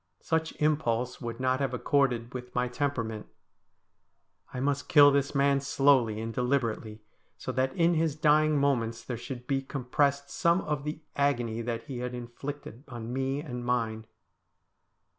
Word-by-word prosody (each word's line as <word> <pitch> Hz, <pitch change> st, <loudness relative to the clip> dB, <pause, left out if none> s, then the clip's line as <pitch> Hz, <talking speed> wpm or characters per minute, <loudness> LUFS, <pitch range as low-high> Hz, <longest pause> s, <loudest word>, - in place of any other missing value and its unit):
Such 160 Hz, 0 st, -1 dB
im 150 Hz, 0 st, +3 dB
pulse 125 Hz, -3 st, -2 dB
would 115 Hz, -1 st, -5 dB
not 130 Hz, 0 st, +1 dB
have 135 Hz, -2 st, -1 dB
accorded 125 Hz, -4 st, +1 dB
with 125 Hz, -1 st, -7 dB
my 125 Hz, 0 st, +1 dB
temperament. 120 Hz, -5 st, -2 dB, 1.2 s
I 130 Hz, -, -5 dB
must 140 Hz, +1 st, -1 dB
kill 145 Hz, -1 st, +8 dB
this 140 Hz, +1 st, 0 dB
man 140 Hz, 0 st, +3 dB
slowly 135 Hz, -5 st, +3 dB
and 115 Hz, +1 st, -4 dB
deliberately, 115 Hz, -4 st, -1 dB, 0.3 s
so -, -, -4 dB
that 130 Hz, 0 st, 0 dB
in 170 Hz, 0 st, +3 dB
his 160 Hz, -2 st, +1 dB
dying 155 Hz, 0 st, +4 dB
moments 120 Hz, -5 st, 0 dB
there 125 Hz, -, -4 dB
should 125 Hz, +1 st, -7 dB
be 135 Hz, +1 st, 0 dB
compressed 140 Hz, +1 st, 0 dB
some 170 Hz, +2 st, +2 dB
of 150 Hz, -2 st, -3 dB
the 150 Hz, +1 st, -4 dB
agony 120 Hz, -5 st, 0 dB
that 115 Hz, 0 st, -3 dB
he 130 Hz, -4 st, -6 dB
had 125 Hz, 0 st, -4 dB
inflicted 125 Hz, +1 st, -7 dB
on 120 Hz, -2 st, -6 dB
me 135 Hz, +2 st, -1 dB
and 125 Hz, -5 st, -6 dB
mine. 115 Hz, -3 st, -1 dB
130 Hz, 160 wpm, -29 LUFS, 120-145 Hz, 1.2 s, kill